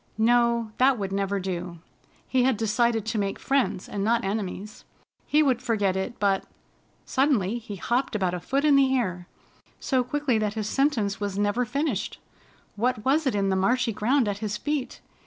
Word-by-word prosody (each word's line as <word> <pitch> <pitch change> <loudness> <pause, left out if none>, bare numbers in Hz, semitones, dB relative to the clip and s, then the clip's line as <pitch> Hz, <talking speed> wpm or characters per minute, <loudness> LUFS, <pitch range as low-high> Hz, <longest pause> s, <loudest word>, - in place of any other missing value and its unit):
No, 235 0 +2
that 260 0 +4
would 195 -2 -3
never 200 0 -1
do! 180 -2 -4 0.5
He 260 - +2
had 255 -2 +2
decided 225 0 +1
to 220 0 -1
make 195 -1 -1
friends 270 -9 0
and 200 - -3
not 230 +2 +2
enemies. 205 0 -4 0.4
He 305 +1 +4
would 255 -4 +1
forget 205 -6 0
it, 190 +5 -4
but 195 -2 +2 0.6
Suddenly 240 -6 +1
he 220 -3 -8
hopped 240 +6 -1
about 185 -4 0
a 180 - -2
foot 275 - -1
in 295 -2 +5
the 265 -1 +4
air, 180 -7 -2 0.5
so 260 -2 +1
quickly 255 -2 0
that 210 0 -1
his 215 -2 -2
sentence 225 -6 0
was 200 -2 -3
never 205 +4 +1
finished. 275 -4 -2 0.6
What 220 0 -1
was 290 +3 +2
it 255 - +1
in 200 -1 +1
the 190 - +1
marshy 235 +5 +1
ground 240 +4 +2
at 200 -1 -2
his 210 -1 -3
feet? 290 +1 -3
225 Hz, 180 wpm, -26 LUFS, 200-255 Hz, 0.6 s, in